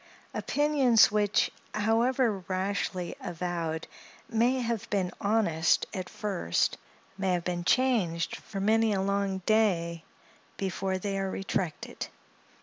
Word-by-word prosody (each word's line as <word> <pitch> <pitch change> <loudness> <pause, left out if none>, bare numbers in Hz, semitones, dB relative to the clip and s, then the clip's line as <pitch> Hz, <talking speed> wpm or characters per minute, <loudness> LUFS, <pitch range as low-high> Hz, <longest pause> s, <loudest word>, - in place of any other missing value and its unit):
Opinions 275 -7 +4
which, 210 -1 +2 0.2
however 225 +1 +2
rashly 185 -1 -2
avowed, 170 -3 -3 0.4
may 240 +3 +2
have 230 -3 -2
been 190 -3 0
honest 200 -6 +2
at 185 -1 -4
first, 190 - -1 0.4
may 190 -1 +1
have 175 -1 0
been 175 0 -2
changed 195 -8 +1
for 200 - -7
many 220 +2 +3
a 190 - 0
long 195 -1 -1
day 170 -7 +2 0.5
before 190 0 -1
they 195 +1 -2
are 195 0 -1
retracted. 190 -4 -3
195 Hz, 115 wpm, -29 LUFS, 180-220 Hz, 0.5 s, Opinions